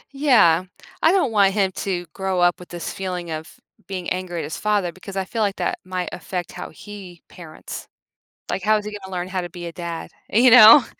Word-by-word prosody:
Yeah. 215 Hz, -, +4 dB, 0.4 s
I 325 Hz, -, +5 dB
don't 360 Hz, -11 st, +2 dB
want 200 Hz, -2 st, +4 dB
him 195 Hz, -2 st, +2 dB
to 180 Hz, -3 st, -2 dB
grow 190 Hz, -2 st, -2 dB
up 175 Hz, 0 st, +3 dB
with 180 Hz, -, -12 dB
this 175 Hz, -1 st, -5 dB
feeling 180 Hz, -3 st, -4 dB
of 155 Hz, +1 st, -7 dB, 0.3 s
being 185 Hz, -2 st, -5 dB
angry 180 Hz, -2 st, -3 dB
at -, -, -3 dB
his 150 Hz, -, -5 dB
father 205 Hz, -4 st, 0 dB
because 190 Hz, +2 st, -11 dB
I 190 Hz, -, -1 dB
feel 225 Hz, +3 st, -3 dB
like 200 Hz, -2 st, +1 dB
that -, -, -2 dB
might 185 Hz, -1 st, -3 dB
affect 180 Hz, -1 st, -5 dB
how 180 Hz, -, -7 dB
he 190 Hz, -1 st, -11 dB
parents. 160 Hz, -3 st, -9 dB, 0.6 s
Like, 190 Hz, -, -2 dB
how 215 Hz, 0 st, +4 dB
is 210 Hz, -, -3 dB
he 210 Hz, -, -5 dB
gonna 190 Hz, -1 st, -10 dB
learn 180 Hz, 0 st, -3 dB
how 185 Hz, -1 st, -2 dB
to 175 Hz, -, -5 dB
be 175 Hz, 0 st, -8 dB
a 170 Hz, -, -6 dB
dad? 170 Hz, -1 st, -6 dB, 0.2 s
You 245 Hz, +4 st, +5 dB
know? 240 Hz, +3 st, +10 dB
185 Hz, 220 wpm, -22 LUFS, 175-205 Hz, 0.6 s, know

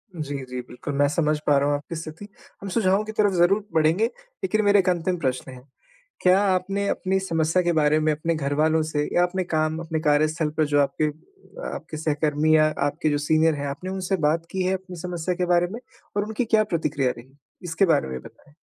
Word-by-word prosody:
जी, 150 Hz, -3 st, -4 dB
जी। 125 Hz, 0 st, -4 dB
बिल्कुल, 125 Hz, +4 st, -6 dB
मैं 145 Hz, 0 st, +4 dB
समझ 155 Hz, 0 st, +1 dB
पा 145 Hz, -, +5 dB
रहा 140 Hz, +1 st, +2 dB
हूँ 145 Hz, -, +2 dB
आपकी 145 Hz, +3 st, -6 dB
स्थिति 160 Hz, +4 st, -8 dB, 0.3 s
हम 195 Hz, -, -5 dB
सुझावों 195 Hz, 0 st, +2 dB
की 220 Hz, -, -5 dB
तरफ़ 210 Hz, -2 st, +2 dB
ज़रूर 185 Hz, +4 st, +3 dB
बढ़ेंगे, 160 Hz, +6 st, +3 dB, 0.4 s
लेकिन 215 Hz, -13 st, +1 dB
मेरा 205 Hz, 0 st, +5 dB
1 185 Hz, -1 st, +2 dB
अंतिम 180 Hz, +1 st, 0 dB
प्रश्न 130 Hz, -3 st, -2 dB
है। 130 Hz, -1 st, -11 dB, 0.6 s
क्या 185 Hz, +1 st, +5 dB
आपने 195 Hz, +1 st, 0 dB
अपनी 190 Hz, +1 st, 0 dB
समस्या 165 Hz, -1 st, +1 dB
के 175 Hz, -, +2 dB
बारे 155 Hz, -1 st, +3 dB
में 155 Hz, 0 st, +2 dB
अपने 165 Hz, +2 st, -1 dB
घरवालों 155 Hz, +2 st, +1 dB
से 150 Hz, -1 st, 0 dB
या 175 Hz, -, +5 dB
अपने 185 Hz, +1 st, -1 dB
काम, 155 Hz, -2 st, -1 dB
अपने 160 Hz, -1 st, -3 dB
कार्यस्थल 155 Hz, +1 st, +2 dB
पर 155 Hz, -, +3 dB
जो 145 Hz, 0 st, +2 dB
आपके 145 Hz, +2 st, 0 dB
अ 390 Hz, -, -9 dB
आपके 155 Hz, -, -7 dB
सहकर्मी 155 Hz, 0 st, +1 dB
या 155 Hz, -, +5 dB, 0.2 s
आपके 155 Hz, +2 st, -1 dB
जो 145 Hz, -, +1 dB
सीनियर 155 Hz, +2 st, +2 dB
हैं। 145 Hz, 0 st, -4 dB
आपने 140 Hz, +7 st, -5 dB
उनसे 190 Hz, 0 st, -1 dB
बात 165 Hz, +2 st, 0 dB
की 190 Hz, -1 st, -1 dB
है 185 Hz, +1 st, +1 dB
अपनी 190 Hz, -1 st, -9 dB
समस्या 180 Hz, 0 st, -3 dB
के 180 Hz, 0 st, 0 dB
बारे 175 Hz, 0 st, +3 dB
में 230 Hz, -, -6 dB, 0.4 s
और 205 Hz, -, +2 dB
उनकी 220 Hz, +3 st, -2 dB
क्या 220 Hz, -1 st, +3 dB
प्रतिक्रिया 155 Hz, -9 st, 0 dB
रही? 130 Hz, +3 st, -14 dB, 0.3 s
इसके 175 Hz, +3 st, +1 dB
बारे 165 Hz, -, +2 dB
में 65 Hz, -1 st, -4 dB
बताएँ। 145 Hz, -, -17 dB
160 Hz, 215 wpm, -24 LUFS, 150-185 Hz, 0.6 s, पा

